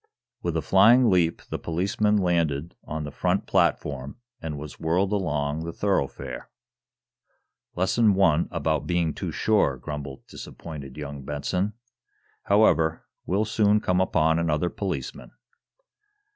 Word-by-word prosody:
With 85 Hz, -2 st, -1 dB
a 80 Hz, -, -2 dB
flying 110 Hz, -, +6 dB
leap 85 Hz, -3 st, +2 dB
the -, -, -2 dB
policeman 100 Hz, +5 st, 0 dB
landed 85 Hz, -5 st, 0 dB
on 80 Hz, 0 st, -4 dB
the 75 Hz, -, -6 dB
front 90 Hz, +6 st, 0 dB
platform 70 Hz, -, 0 dB, 0.2 s
and 80 Hz, -2 st, -4 dB
was 75 Hz, 0 st, -9 dB
whirled 90 Hz, +5 st, +1 dB
along 75 Hz, -6 st, -1 dB
the 85 Hz, -, -4 dB
thoroughfare. 95 Hz, -7 st, -2 dB, 1.3 s
"Lesson 95 Hz, +6 st, +1 dB
number 100 Hz, -3 st, +4 dB
one 85 Hz, -4 st, +4 dB
about 80 Hz, -2 st, -1 dB
being 85 Hz, -3 st, +1 dB
too -, -, -4 dB
sure," 105 Hz, -11 st, +2 dB
grumbled 70 Hz, 0 st, -7 dB
disappointed 70 Hz, -5 st, -9 dB
young 70 Hz, -2 st, -6 dB
Benson. 90 Hz, +9 st, -2 dB, 0.7 s
"However, 85 Hz, -6 st, +3 dB, 0.2 s
we'll 100 Hz, +4 st, +1 dB
soon 105 Hz, -1 st, +3 dB
come 90 Hz, -2 st, +1 dB
upon 80 Hz, -3 st, +2 dB
another 85 Hz, +1 st, 0 dB
policeman." 100 Hz, -2 st, -5 dB
85 Hz, 130 wpm, -25 LUFS, 75-95 Hz, 1.3 s, flying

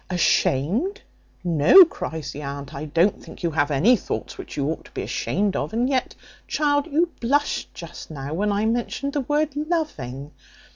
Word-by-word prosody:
"Ashamed! 185 Hz, -, +1 dB, 0.4 s
no," 175 Hz, -, +8 dB
cries 160 Hz, -, -5 dB
the 145 Hz, -, -7 dB
aunt, 140 Hz, 0 st, -6 dB
"I 140 Hz, +2 st, -5 dB
don't 170 Hz, +6 st, +1 dB
think -, -, -12 dB
you 170 Hz, -, +1 dB
have 145 Hz, -1 st, +1 dB
any 160 Hz, -, +4 dB
thoughts 210 Hz, -, -5 dB
which -, -, -9 dB
you 140 Hz, -1 st, 0 dB
ought 160 Hz, -, -3 dB
to -, -, -16 dB
be -, -, -3 dB
ashamed 200 Hz, +1 st, -1 dB
of; -, -, -2 dB
and 240 Hz, +3 st, +1 dB
yet, 260 Hz, -2 st, -1 dB, 0.3 s
child, 290 Hz, -1 st, +1 dB
you 335 Hz, +3 st, +1 dB
blushed 285 Hz, +5 st, 0 dB
just 170 Hz, -1 st, -9 dB
now 140 Hz, -1 st, -6 dB
when 205 Hz, +5 st, 0 dB
I 205 Hz, +2 st, +1 dB
mentioned 240 Hz, +5 st, -1 dB
the 290 Hz, -, 0 dB
word 295 Hz, +2 st, 0 dB
loving. 290 Hz, -, -3 dB
200 Hz, 180 wpm, -23 LUFS, -, 0.4 s, no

